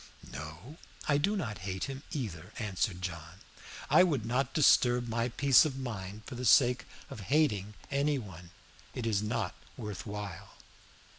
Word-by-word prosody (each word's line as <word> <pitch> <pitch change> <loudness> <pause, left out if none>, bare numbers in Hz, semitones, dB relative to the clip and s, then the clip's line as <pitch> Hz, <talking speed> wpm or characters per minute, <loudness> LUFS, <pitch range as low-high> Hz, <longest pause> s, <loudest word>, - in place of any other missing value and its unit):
"No, 80 - -8 0.3
I 145 -1 +3
do 200 +8 +1
not 115 - -3
hate 95 +1 -4
him 135 0 -4
either," 105 - -5
answered 100 -4 -2
John. 85 +1 -6 0.5
"I 155 +5 +6
would 145 - 0
not 125 +4 0
disturb 125 -5 +4
my 115 +1 0
peace 135 +2 +6
of 140 -4 -2
mind 105 -5 -6
for - - -8
the 125 +1 -5
sake 125 +1 +5 0.3
of - - -7
hating 105 -10 +2 0.2
any 140 +1 +2
one. 90 -7 -9 0.5
It 120 - -3
is 105 -3 +1
not 110 +2 -2 0.2
worth 105 -4 -6
while." 100 -2 -6
115 Hz, 155 wpm, -31 LUFS, 95-135 Hz, 0.5 s, I